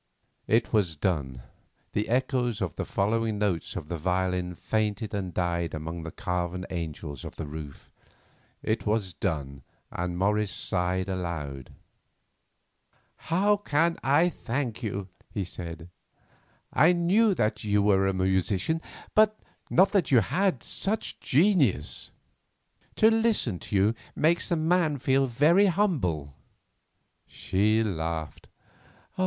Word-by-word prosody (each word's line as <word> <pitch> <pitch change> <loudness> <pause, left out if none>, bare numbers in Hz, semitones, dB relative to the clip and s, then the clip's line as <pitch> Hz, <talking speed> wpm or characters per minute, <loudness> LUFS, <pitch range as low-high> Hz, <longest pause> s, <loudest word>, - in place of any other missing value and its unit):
It 115 +2 +2
was 95 -7 +2
done; 70 -8 -2 0.5
the 105 +1 -1
echoes 125 -2 0
of 90 -7 -3
the - - -3
following 110 +2 0
notes 100 -5 -1
of 85 -5 -5
the 85 0 -4
violin 90 +1 -1
fainted 110 +2 -1
and 95 -3 -3
died 85 -2 -1
among 80 +2 -5
the 80 0 -6
carven 90 +1 -3
angels 80 -5 -5
of - - -8
the 80 - -5
roof. 75 -1 -9 0.7
It 110 0 -1
was 105 -4 0
done, 70 -4 -3 0.3
and 90 0 -3
Morris 105 +2 +1
sighed 90 0 -1
aloud. 80 -8 -5 1.4
"How 200 +5 +2
can 165 -3 +1
I 155 +6 +4
thank 125 -6 -3
you?" 100 -4 -3 0.2
he 100 - -3
said. 85 -2 -7 0.9
"I 165 +4 +5
knew 190 +5 +3
that 105 -7 0
you 105 -1 +2
were 95 -1 +3
a 95 - +1
musician, 95 - +1 0.3
but 215 0 +4 0.3
not 190 +2 +4
that 195 -9 +2
you 125 -4 +6
had 180 - 0
such 205 +2 -2
genius. 145 - +2 0.9
To 220 +1 +5
listen 225 - +1
to - - -5
you 100 +3 +4 0.2
makes 165 +3 +2
a 175 - +2
man 160 -1 +2
feel 135 +1 +2
very 155 - +4
humble." 130 - 0 0.9
She 110 +4 +1
laughed. 80 -5 -4
105 Hz, 125 wpm, -27 LUFS, 85-145 Hz, 1.4 s, you